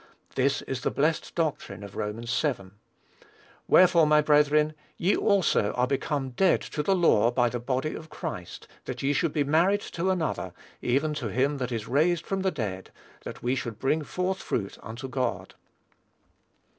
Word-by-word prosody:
This 140 +2 +1
is 130 -1 -4
the - - 0
blessed 155 +3 -1
doctrine 155 -10 -2
of 100 -1 -10
Romans 115 +4 -2
vii. 115 -12 -2 1.0
"Wherefore, 175 -3 +6
my 150 0 +5
brethren, 150 0 +3 0.2
ye 185 +4 +2
also 185 - +2
are 125 - +2
become 135 0 -2
dead 180 +9 +3
to 150 - -4
the 190 +6 +2
law 120 - +4
by 120 0 +2
the 120 - -4
body 130 +5 -2
of 160 0 -9
Christ, - - -7 0.2
that - - -5
ye 140 +1 +2
should 145 +3 +1
be 145 - +1
married 170 +8 +3
to 180 0 -3
another, 180 -4 -1 0.3
even 140 +5 +1
to 140 -6 -3
him 135 +7 0
that 125 -1 -3
is 115 -3 -3
raised 160 +5 +2
from 195 -1 -2
the 190 - +2
dead, 105 - -5 0.3
that - - -8
we 125 +1 +1
should 120 -4 -4
bring 145 +6 +1
forth 180 +5 -2
fruit 100 -4 -3
unto 115 +4 -7
God." 130 -2 -3
140 Hz, 170 wpm, -27 LUFS, 125-160 Hz, 1.0 s, Wherefore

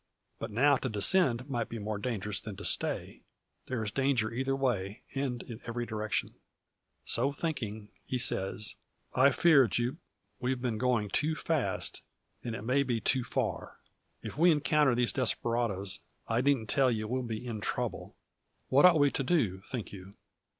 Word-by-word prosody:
But - - -4
now 140 +6 +4
to 130 - -3
descend 125 - +2
might 120 -5 -2
be 115 - -5
more 105 -1 -3
dangerous 105 -3 -2
than 105 -3 -7
to 100 - -8
stay. - - -2 0.5
There 125 -4 -2
is 105 - -2
danger 130 -5 +1
either 135 +2 0
way, 110 -6 -1
and 135 -3 -2
in 115 -1 -9
every 120 +1 -2
direction. 110 -2 -2 0.7
So 130 +4 +1
thinking, 115 -9 -4
he 130 - -2
says: 105 -2 0 0.4
"I 130 +2 +6
fear, 140 -2 +5
Jupe, 120 +7 -1 0.4
we've 130 0 -1
been 120 -4 -2
going 120 -5 +1
too 155 +2 +1
fast, 145 -13 0 0.4
and 115 -2 -3
it 120 - -6
may 130 +5 +2
be 125 -4 0
too 130 +2 +1
far. - - -3 0.5
If - - -7
we 175 +2 +6
encounter 150 -3 +3
these 120 -1 +1
desperadoes, 115 -7 0 0.3
I 115 +1 +1
needn't 130 -5 +2
tell 135 -2 +4
you 110 -2 -1
we'll 130 +3 -1
be 115 -1 -5
in 115 -3 -4
trouble. - - -3 0.5
What 140 +5 +6
ought 180 -3 +7
we 145 -1 +4
to - - -1
do, 125 - +1
think 110 +3 -6
you?" 100 +1 -10
120 Hz, 170 wpm, -31 LUFS, 110-135 Hz, 0.7 s, ought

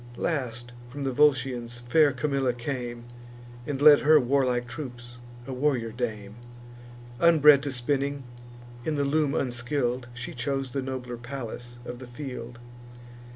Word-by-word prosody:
Last, 120 -6 -3 0.2
from 140 +3 -6
the 135 - 0
Volscians 125 -4 +2
fair 145 +5 +3
Camilla 135 -1 0
came, 120 -1 -5 0.6
And 140 -2 -2
led 145 0 +8
her 155 +1 +6
warlike 125 -2 +1
troops, 120 -4 -8 0.3
a 130 - -5
warrior 125 -4 0
dame; 110 -3 -5 0.8
Unbred 150 -4 +7
to 145 -1 -3
spinning, 140 +2 -1 0.6
in 155 +4 -1
the 145 - +1
loom 145 0 +1
unskill'd, 125 0 -1
She 120 0 -6
chose 135 +1 -2
the 135 - -2
nobler 130 -2 -5
Pallas 120 -1 -7
of 120 0 -7
the 130 - -9
field. 120 -2 -7
130 Hz, 135 wpm, -27 LUFS, 120-140 Hz, 0.8 s, led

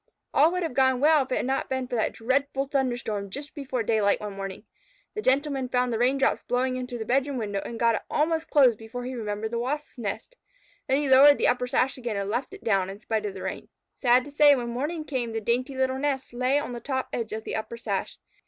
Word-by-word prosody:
All 310 +4 +5
would 365 0 -1
have 325 - -3
gone 260 -1 +3
well 305 +2 +5
if 260 - -5
it - - +2
had - - -1
not 265 +1 -1
been 260 -1 -2
for - - -9
that 225 -2 0
dreadful 270 +3 0
thunderstorm 240 -7 -2
just 285 +9 -7
before 265 -5 -3
daylight 215 -2 +2
one 210 -1 -6
morning. 195 0 -6 0.5
The 430 - -3
Gentleman 270 -3 +1
found 250 -1 +1
the 225 - -1
raindrops 265 +3 +2
blowing 255 +1 0
in 255 0 -4
through 245 -1 -5
the 220 - -5
bedroom 270 +3 +1
window, 205 -4 -2
and 230 - -7
got 230 -1 +4
it - - -1
almost 320 +1 0
closed 255 -7 +5
before 225 +2 -7
he 255 - -4
remembered 220 -2 -4
the 235 - -1
Wasps' 280 +2 -4
nest. 220 - -5 0.5
Then 265 - +3
he 290 0 0
lowered 275 +2 +8
the - - +2
upper 250 0 +1
sash 260 +2 +1
again 235 -4 -3
and 200 0 -2
left 250 +6 -2
it 400 - -11
down, 195 -4 +1
in 195 +1 -8
spite 220 -1 -2
of 195 - -6
the 190 - -7
rain. - - -5 0.2
Sad 250 -1 +3
to 290 - -10
say, 290 0 +6
when 240 -2 -3
morning 300 +7 -3
came 245 -6 -3
the 225 - -1
dainty 250 +5 -1
little 260 0 0
nest 270 -3 -2
lay 255 +3 +1
on 290 - -2
the 240 - -5
top 260 +1 -3
edge 230 -2 -3
of 220 +1 -4
the - - -4
upper 220 +1 -4
sash. 205 -4 -3
250 Hz, 245 wpm, -26 LUFS, 225-275 Hz, 0.5 s, lowered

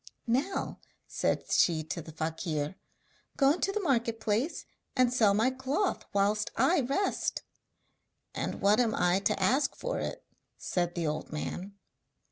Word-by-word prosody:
'Now,' 265 +11 -1 0.3
said - - -1
she 160 -3 +3
to 155 +2 -4
the 160 - -10
fakir, 160 0 -2 0.6
'go 275 -1 +5
into 360 +5 0
the 425 - -1
market 235 - +1
place 225 +8 -1 0.3
and 255 -2 +3
sell 215 -5 +4
my 225 +5 +3
cloth 270 +9 -1
whilst 205 +1 +1
I 275 +9 +4
rest.' 275 +11 -1 0.9
'And - - -3
what 205 +3 +4
am 230 -3 +2
I 180 +1 +3
to 195 - 0
ask 260 +10 +2
for - - -3
it?' - - -5 0.3
said 175 -1 -1
the 170 -2 -1
old 155 0 -3
man. 180 +6 -5
220 Hz, 145 wpm, -30 LUFS, 175-265 Hz, 0.9 s, go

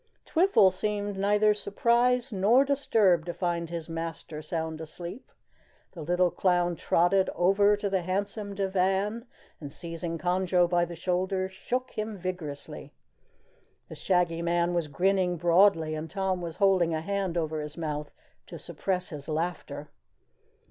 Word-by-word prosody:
Twiffle 330 - +4
seemed 205 +1 -2
neither 210 +2 +3
surprised 235 +4 +1
nor 220 +8 +4
disturbed 210 - +2
to 175 - -4
find 170 -2 -2
his 170 -2 -5
master 165 -2 -5
sound 160 0 -4
asleep. 175 +7 -8 0.6
The 170 - -9
little 175 +3 +2
clown 175 -2 +1
trotted 180 +4 +2
over 200 +3 +4
to 205 - -2
the 190 -2 0
handsome 200 +3 -3
divan 195 +4 0 0.3
and, 145 -3 -8
seizing 165 +1 -5
Conjo 180 +1 +2
by 175 0 +2
the 170 0 -8
shoulders, 185 +2 -1
shook 250 +7 -3
him 215 -1 -4
vigorously. 175 -6 -6 1.0
The - - -8
Shaggy 175 -2 +1
Man 170 +1 +1
was 170 -3 0
grinning 180 +3 +1
broadly, 170 -1 +4
and 155 +1 -5
Tom 190 0 -1
was 170 -2 -5
holding 185 -5 +3
a 155 - -2
hand 195 -1 -2
over 155 -2 -1
his 150 +1 -7
mouth 150 -2 -3 0.4
to - - -8
suppress 185 -2 -3
his 150 -1 -7
laughter. 155 -2 -4
180 Hz, 140 wpm, -28 LUFS, 165-200 Hz, 1.0 s, Twiffle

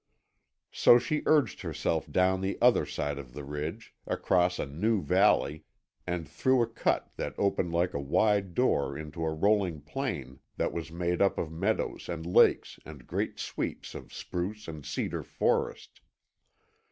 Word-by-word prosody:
So 120 - +6
she 150 +5 -1
urged 145 -10 +3
herself - - -2
down 95 0 +2
the 95 +1 -2
other 125 0 +4
side 75 -1 -3
of 65 -3 -10
the 75 - -7
ridge, 75 +9 -5
across 90 -1 +2
a - - -2
new 95 +9 0
valley, 75 +1 +3 0.4
and 90 -2 -2
through 130 -2 +2
a - - -1
cut 115 - -1
that - - -4
opened 95 -3 0
like 85 +2 +1
a - - -2
wide 95 +6 +1
door 70 - +1
into 80 +2 -6
a 80 - 0
rolling 95 0 +1
plain 75 - -4 0.2
that - - 0
was 80 -1 -5
made 85 +1 -1
up 100 - +3
of 80 - -3
meadows 95 +7 -2
and 85 -2 -4
lakes 90 - +3
and 70 -5 -11
great - - -2
sweeps - - -4
of - - -9
spruce 95 +4 -5
and 80 -3 -8
cedar - - -2
forest. - - -1
90 Hz, 160 wpm, -29 LUFS, 75-105 Hz, 0.4 s, So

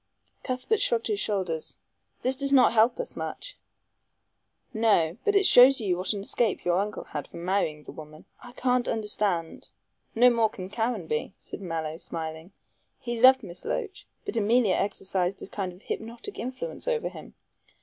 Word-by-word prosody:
Cuthbert 255 - -1
shrugged 230 -1 +2
his 210 -2 -1
shoulders. 185 -7 -2 0.5
"This 260 +1 +1
does 275 +1 -2
not 265 -4 +6
help 230 - +4
us - - -4
much." - - -6 1.2
"No. 210 -5 +2
But 415 - +1
it 400 -1 +5
shows 260 -1 +8
you 195 -5 0
what 185 +1 -1
an 200 - -4
escape 215 +1 0
your 175 +1 +2
uncle 210 +1 -3
had 150 -2 -6
from 170 - -9
marrying 170 -6 0
the - - -10
woman. 155 0 -12 0.2
I 245 - -12
can't 250 -1 +1
understand 210 -6 -1 0.2
" - - -44
"No 245 +2 +6
more 230 -2 +2
can 185 -1 -8
Caranby," 210 -9 -2
said - - -8
Mallow, 160 -3 -4
smiling; 160 +1 -6 0.5
"he 240 -2 -4
loved 260 0 +7
Miss 175 -3 -8
Loach, 410 -3 -4 0.2
but - - -4
Emilia 225 -1 +3
exercised 190 -2 -1
a - - -7
kind 195 -2 -4
of 180 +3 -17
hypnotic 235 - -6
influence 260 - -5
over 475 -2 0
him. - - -12
210 Hz, 170 wpm, -27 LUFS, 180-250 Hz, 1.2 s, shows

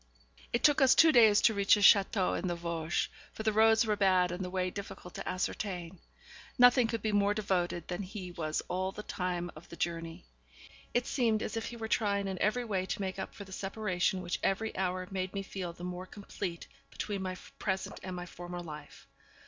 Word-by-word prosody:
It 240 - 0
took 295 -2 +5
us 265 -1 +6
two 320 -1 +7
days 220 -6 +6
to 220 - +5
reach 200 -1 +5
his 205 - 0
château 195 -1 +5
in 185 - -2
the 175 - -1
Vosges, 170 -1 -1 0.3
for 220 - -6
the 220 -1 +1
roads 220 +1 +5
were 215 -1 +1
bad 185 -3 +3
and 180 +2 -4
the 180 - -4
way 185 0 -1
difficult 190 -3 -8
to - - -5
ascertain. 185 -1 -3 0.6
Nothing 245 -1 +6
could 225 -2 -3
be 215 - +1
more 205 0 +2
devoted 180 -5 -1
than 180 +2 -3
he 190 -2 -7
was 155 -2 -2
all 185 +1 -1
the 210 - -8
time 175 -2 -3
of 155 - -13
the - - -9
journey. 165 -1 -4 0.7
It 245 0 +1
seemed 225 -5 +1
as 215 - -4
if 225 - -2
he 235 - -7
were 225 -1 -4
trying 200 -3 +1
in 190 -2 -4
every 240 +4 +1
way 190 -4 -1
to - - -3
make 190 -1 -3
up 190 - -6
for 205 - -8
the 195 - -14
separation 190 -2 -1
which 175 - -2
every 220 +3 0
hour 185 -1 -1
made 185 0 -3
me 195 - -2
feel 190 -2 -5
the 170 +1 -12
more 180 +1 -5
complete 190 -4 -6 0.2
between 205 -2 -4
my 185 -1 -3 0.2
present 190 -2 -2
and 185 -1 -6
my 175 0 -5
former 175 0 -7
life. 150 -3 -10
190 Hz, 215 wpm, -31 LUFS, 180-210 Hz, 0.7 s, two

